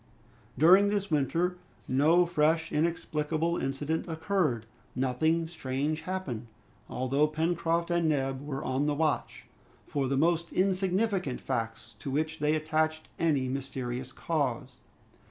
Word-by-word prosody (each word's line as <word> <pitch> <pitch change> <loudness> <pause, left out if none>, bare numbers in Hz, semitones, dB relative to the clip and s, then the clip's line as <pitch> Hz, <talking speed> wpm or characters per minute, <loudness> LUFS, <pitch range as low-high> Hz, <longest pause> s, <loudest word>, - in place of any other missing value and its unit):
During 185 +8 +7
this 200 -2 -1
winter, 170 +5 +1 0.3
no 155 +7 +4
fresh 160 -1 +1
inexplicable 160 +1 0
incident 145 +5 -2
occurred. 160 - 0 0.3
Nothing 155 +6 +1
strange 150 -1 -2
happened, 150 -12 -4 0.4
although 135 +4 +1
Pencroft 165 +2 0
and 170 -2 +2
Neb 135 -3 0
were 140 -2 -4
on 130 +3 0
the 150 - +1
watch 155 -1 -1 0.4
for 140 -2 -1
the 135 +1 0
most 170 +3 +2
insignificant 190 - +1
facts 115 0 -4
to - - -5
which 155 +3 -1
they 150 +1 +2
attached 155 0 0
any 145 -6 +2
mysterious 130 -1 -4
cause. 130 -5 -2
155 Hz, 120 wpm, -29 LUFS, 135-170 Hz, 0.4 s, During